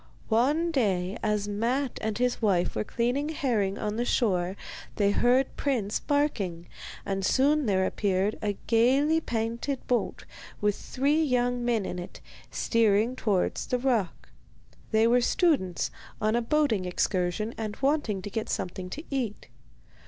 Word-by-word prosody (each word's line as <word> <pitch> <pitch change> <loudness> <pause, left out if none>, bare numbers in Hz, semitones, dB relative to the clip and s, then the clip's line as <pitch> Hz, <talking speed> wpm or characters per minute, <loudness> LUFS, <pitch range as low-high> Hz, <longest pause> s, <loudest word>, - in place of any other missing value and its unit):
One 290 +9 +2
day 195 - 0
as 210 -1 0
Matte 240 +6 -1
and 215 -1 -2
his 250 0 0
wife 185 -5 +1
were - - 0
cleaning 245 +7 -1
herring 220 -10 0
on 210 0 -3
the 240 - +1
shore 190 -7 +1 0.4
they 200 -1 +2
heard 250 +5 +2
Prince 230 -7 0
barking, 205 - -1 0.4
and 195 0 -2
soon 280 +5 +3
there 190 -2 +2
appeared 195 +1 0
a 205 -2 -1
gaily 270 +7 +3
painted 235 +2 -3
boat 245 -1 -1 0.3
with 205 -1 +1
three 285 +4 0
young 245 -4 +1
men 235 -4 +1
in 180 - -4
it, 175 - -8 0.3
steering 225 +1 +2
towards 205 -7 0
the 250 - +1
rock. 240 -8 -1 0.6
They 220 0 +3
were 245 +2 +4
students, 240 - +1 0.3
on 215 +1 +1
a 240 - +2
boating 230 -6 +1
excursion, 180 +4 -1
and 215 -2 -4
wanted 270 -9 0
to 205 - -5
get 220 0 -3
something 180 0 -3
to 300 - -6
eat. 245 -6 -3
225 Hz, 145 wpm, -27 LUFS, 200-260 Hz, 0.6 s, were